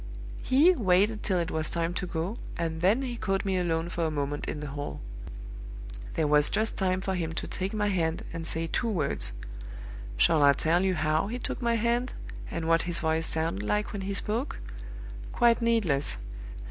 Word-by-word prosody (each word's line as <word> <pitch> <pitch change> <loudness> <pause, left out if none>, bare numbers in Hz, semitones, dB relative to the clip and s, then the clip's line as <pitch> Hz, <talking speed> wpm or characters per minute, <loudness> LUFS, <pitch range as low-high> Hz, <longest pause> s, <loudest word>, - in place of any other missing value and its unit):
He 290 +8 +5
waited 210 - +2
till 185 - +1
it 170 0 -1
was 155 -1 -1
time 170 0 -1
to 185 +1 -3
go, 175 +7 -3 0.2
and 165 -1 -2
then 210 +9 +3
he 245 -2 -3
caught 195 -3 -1
me 190 -1 +1
alone 165 -1 0
for 170 - -2
a 160 - +1
moment 145 -1 -2
in 150 - -3
the 150 -1 -5
hall. 145 +1 -5 1.2
There 160 - +1
was 150 0 +4
just 220 +1 0
time 185 -1 0
for 190 0 -1
him 165 -3 -2
to - - -3
take 190 +1 -3
my 210 -1 0
hand, 165 -4 0
and 165 0 -3
say 165 0 0
two 230 +8 -1
words. 150 - +2 0.9
Shall 155 - +4
I 140 0 +7
tell 165 +6 +2
you 190 -1 +2
how 155 +3 +1
he 235 +4 -3
took 250 - -4
my 235 -1 +2
hand, 235 +2 0 0.4
and 165 -1 -3
what 165 0 +4
his 170 - +1
voice 160 0 0
sounded 160 -11 -1
like 210 - -1
when 200 - -3
he 195 +1 -3
spoke? 225 +8 -1 0.7
Quite 235 0 +4
needless! 200 - +2
175 Hz, 195 wpm, -28 LUFS, 160-210 Hz, 1.2 s, I